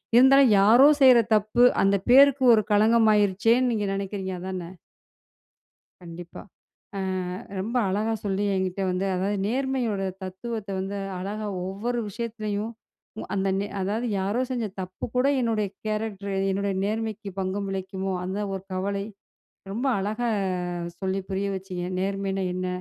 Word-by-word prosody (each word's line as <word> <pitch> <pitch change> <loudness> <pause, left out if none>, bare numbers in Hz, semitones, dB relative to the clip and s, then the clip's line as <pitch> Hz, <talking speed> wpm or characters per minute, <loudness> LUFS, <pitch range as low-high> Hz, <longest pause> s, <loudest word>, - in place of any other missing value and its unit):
இருந்தாலும், 265 0 +7
யாரோ 235 +8 +7
செய்ற 260 -2 +8 0.2
தப்பு. 215 +3 +2 0.2
அந்த 195 0 +4
பேருக்கு 275 +1 +6
ஒரு 215 -1 +4
களங்கம் 220 +2 +4
ஆகிருச்சேனு 210 +5 +3
நீங்க 210 -2 -1
நெனைக்கிறீங்க, 195 -1 -4
அதானே? 185 -1 -5 1.3
கண்டிப்பா. 175 0 -10 0.6
அ - - -2 0.6
ரொம்ப 225 +6 -4
அழகா 215 +4 0
சொல்லி 200 0 0
என்கிட்டே 190 0 -1
வந்து 180 +2 -1
அதாவது 195 +3 -1
நேர்மையோட 255 -4 -1 0.2
தத்துவத்த 205 +3 -6
வந்து 195 +2 -4 0.2
அழகா, 210 +3 -4 0.2
ஒவ்வொரு 235 +5 -3
விஷயத்துலயும், 215 0 -4 0.6
அந்த 195 0 0
நெ 200 - -2
அதாவது 215 +6 -1
யாரோ 205 +6 0
செஞ்ச 240 -3 -1 0.2
தப்பு 185 0 -6
கூட, 250 +1 +3 0.2
என்னுடைய 220 -3 0 0.2
கேரக்டர் 210 -2 -3 0.2
என்னுடைய 200 0 -1
நேர்மைக்கு 215 -1 -3
பங்கம் 195 +1 -2
விளைக்குமோ? 190 0 -3
அந்த 190 +2 -4 0.2
ஒரு 190 -1 -5
கவலை, 200 +1 -2 0.7
ரொம்ப 245 +6 -2
அழகா 215 +5 -2 0.7
சொல்லி 190 0 -1
புரிய 195 +1 -1
வச்சீங்க. 185 -2 -6 0.2
நேர்மைனா 195 0 -2
என்ன? 185 0 -3
200 Hz, 130 wpm, -25 LUFS, 190-225 Hz, 1.3 s, செய்ற